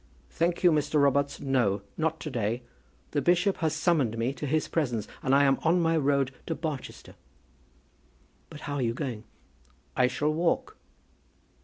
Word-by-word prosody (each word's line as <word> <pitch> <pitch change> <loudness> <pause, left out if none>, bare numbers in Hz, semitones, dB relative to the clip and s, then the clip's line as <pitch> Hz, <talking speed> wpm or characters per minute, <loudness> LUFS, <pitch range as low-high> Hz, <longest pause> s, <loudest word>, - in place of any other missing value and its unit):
"Thank 170 +2 0
you, 175 - +7
Mr. 150 0 +1
Robarts; 140 0 +2
no, 120 -8 +1
not 160 0 -1
to 150 - -5
day. 115 0 -2 0.5
The 145 - 0
bishop 180 +6 +2
has 160 -2 0
summoned 155 -9 +1
me 120 +4 0
to 145 - -5
his 155 +3 0
presence, 120 -10 -1
and 135 +1 +2
I 140 - +5
am 135 -1 +3
on 170 +2 +3
my 165 -1 +2
road 140 -3 +2 0.2
to 165 - -1
Barchester." 155 -4 -6 1.4
"But 155 -2 -10
how 145 -1 -4
are - - -1
you 115 -1 0
going?" 120 -6 -4 0.7
"I 125 -1 +4
shall 150 +4 0
walk." 175 - 0
145 Hz, 165 wpm, -28 LUFS, 130-160 Hz, 1.4 s, you